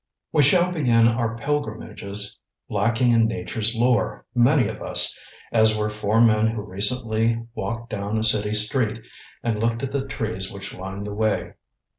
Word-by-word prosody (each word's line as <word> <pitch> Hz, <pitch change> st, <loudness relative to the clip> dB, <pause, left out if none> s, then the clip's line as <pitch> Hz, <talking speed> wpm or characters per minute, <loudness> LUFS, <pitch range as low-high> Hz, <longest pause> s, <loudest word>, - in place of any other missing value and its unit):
We 150 Hz, -, +3 dB
shall 175 Hz, +5 st, +4 dB
begin 120 Hz, -9 st, +3 dB
our 115 Hz, -1 st, -1 dB
pilgrimages 110 Hz, -7 st, -4 dB, 0.3 s
lacking 120 Hz, +1 st, +1 dB
in 115 Hz, -1 st, +4 dB
Nature's 115 Hz, 0 st, +1 dB
lore, 120 Hz, +1 st, +1 dB
many 125 Hz, 0 st, +3 dB
of 110 Hz, -1 st, -7 dB
us, -, -, +3 dB, 0.4 s
as 110 Hz, -1 st, +3 dB
were 105 Hz, 0 st, -1 dB
four 105 Hz, +1 st, 0 dB
men 110 Hz, -1 st, +4 dB
who 110 Hz, -2 st, -3 dB
recently 115 Hz, +3 st, -1 dB
walked 115 Hz, 0 st, -5 dB
down 105 Hz, +1 st, -3 dB
a 110 Hz, -, 0 dB
city 105 Hz, -1 st, +2 dB
street 110 Hz, +1 st, +2 dB, 0.4 s
and 115 Hz, -2 st, -1 dB
looked 115 Hz, +2 st, -1 dB
at 135 Hz, -, -3 dB
the 140 Hz, -1 st, -2 dB
trees 110 Hz, -7 st, -4 dB
which 100 Hz, 0 st, -8 dB
lined 95 Hz, +2 st, -7 dB
the 105 Hz, -, -5 dB
way. 110 Hz, 0 st, -1 dB
110 Hz, 160 wpm, -23 LUFS, 105-120 Hz, 0.4 s, shall